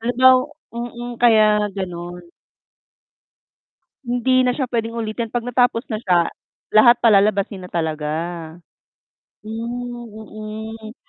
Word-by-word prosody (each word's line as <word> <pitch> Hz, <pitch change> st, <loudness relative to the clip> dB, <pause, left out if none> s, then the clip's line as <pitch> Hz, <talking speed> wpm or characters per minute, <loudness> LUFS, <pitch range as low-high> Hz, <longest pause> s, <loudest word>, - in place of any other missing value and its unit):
halimbaw 255 Hz, +3 st, +4 dB, 0.2 s
mm, 240 Hz, +1 st, -6 dB
kaya 215 Hz, -3 st, +4 dB
gano'n. 175 Hz, -2 st, -6 dB, 1.7 s
Hindi 245 Hz, +1 st, +2 dB
na 250 Hz, -, +2 dB
siya 260 Hz, +1 st, -1 dB
puwedeng 230 Hz, -1 st, -3 dB
ulitin. 225 Hz, 0 st, -3 dB
'Pag 240 Hz, 0 st, -3 dB
natapos 245 Hz, -1 st, +1 dB
na 215 Hz, -, -3 dB
siya, 175 Hz, -4 st, +3 dB, 0.5 s
lahat 235 Hz, +3 st, +7 dB
palalabasin 200 Hz, -3 st, +3 dB
na -, -, -17 dB
talaga. 160 Hz, -3 st, -2 dB, 1.4 s
Hmm, 240 Hz, +2 st, -6 dB
mm. 220 Hz, +1 st, -9 dB
225 Hz, 105 wpm, -20 LUFS, 210-240 Hz, 1.7 s, lahat